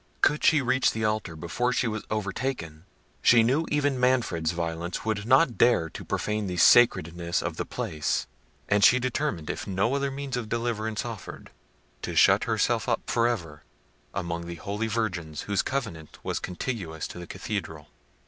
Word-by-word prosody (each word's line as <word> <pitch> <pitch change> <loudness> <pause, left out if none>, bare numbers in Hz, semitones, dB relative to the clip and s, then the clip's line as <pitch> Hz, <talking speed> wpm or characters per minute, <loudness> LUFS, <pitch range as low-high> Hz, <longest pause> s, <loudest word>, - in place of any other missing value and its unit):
Could 150 +1 +3
she 150 -3 +5
reach 130 +1 +2
the 110 -1 -1
altar 105 -6 -1
before 90 +10 -1
she 125 -1 +1
was 110 -1 -4
overtaken, 100 - -3 0.4
she 120 -2 +6
knew 140 +8 +1
even 145 -3 +1
Manfred's 125 -11 +1
violence 85 +2 -3
would 110 -1 -2
not 130 0 +4
dare 100 -10 +4
to - - -8
profane 105 -1 -2
the 90 -1 -4
sacredness 85 -6 +4
of - - -4
the - - -3
place; 75 -1 -2 0.4
and 105 0 +2
she 125 - +7
determined, 125 - -2
if - - -6
no 100 +6 0
other 140 0 0
means 135 -1 -4
of 120 -3 -4
deliverance 110 -2 -2
offered, 115 -6 -8 0.5
to - - -4
shut - - +5
herself - - +1
up - - +1
for 115 0 +2
ever 80 -10 -3 0.5
among 85 -3 -4
the 85 - -5
holy 100 +6 -3
virgins 95 -9 -2
whose 100 -1 0
convent 80 - -4
was - - -2
contiguous 90 -5 -4
to - - -9
the 85 - -8
cathedral. 80 -7 -5
110 Hz, 165 wpm, -27 LUFS, 85-125 Hz, 0.5 s, she